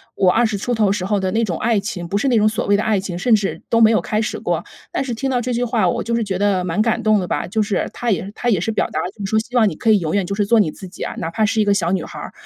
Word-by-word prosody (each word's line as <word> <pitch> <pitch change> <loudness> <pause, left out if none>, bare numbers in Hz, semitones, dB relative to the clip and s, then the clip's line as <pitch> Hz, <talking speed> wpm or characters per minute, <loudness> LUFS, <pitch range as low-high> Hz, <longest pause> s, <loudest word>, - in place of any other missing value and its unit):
我 185 -2 +4
20 225 +1 +2
出 225 +5 -3
头 210 -3 +2
时 200 -2 -1
候 205 +1 +1
的 190 -1 -1
那 225 +4 +1
种 180 -7 -2
爱 225 -2 +1
情， 195 -4 -5
不 195 - -4
是 245 - 0
那 240 - +3
种 215 0 +4
所 220 - -3
谓 200 0 +4
的 210 - -1
爱 215 -2 +1
情， 185 -2 -5
甚 235 +5 +2
至 200 -2 -2
都 230 - +3
没 220 - +7
有 220 - +3
开 215 0 -1
始 220 - -3
过， - - -1 0.3
但 - - -1
是 255 -3 -4
听 270 +4 -2
到 250 -1 +1
这 250 +1 -3
句 240 +1 0
话 225 -6 +1
我 - - -1
就 235 - -1
是 230 - 0
觉 195 -3 -2
得 195 -2 +1
蛮 180 +2 -2
感 225 0 +1
动 215 -1 +4
的 180 - -3
吧， - - -2
就 215 +4 0
是 205 -1 -1
他 240 -1 -1
也 195 0 -2
他 245 - -1
也 190 -6 +1
是 225 - -1
表 215 - 0
达 - - -2
了， 180 - -3
就 200 -1 -7
是 - - -3
说 220 - +3
希 235 +3 -7
望 225 -3 +5
你 155 - -7
可 225 - -1
以 215 - +6
永 160 -3 -3
远 200 - +2
就 200 - -3
是 205 0 +1
做 230 +2 +4
你 200 - +3
自 190 - -10
己 180 - -13
啊， - - -4
哪 165 - -4
怕 220 +4 0
是 220 +1 0
一 - - +2
个 205 - +3
小 175 -4 0
女 185 -3 0
孩 - - -9
儿， - - -7
210 Hz, 385 characters per minute, -20 LUFS, 190-225 Hz, 0.3 s, 没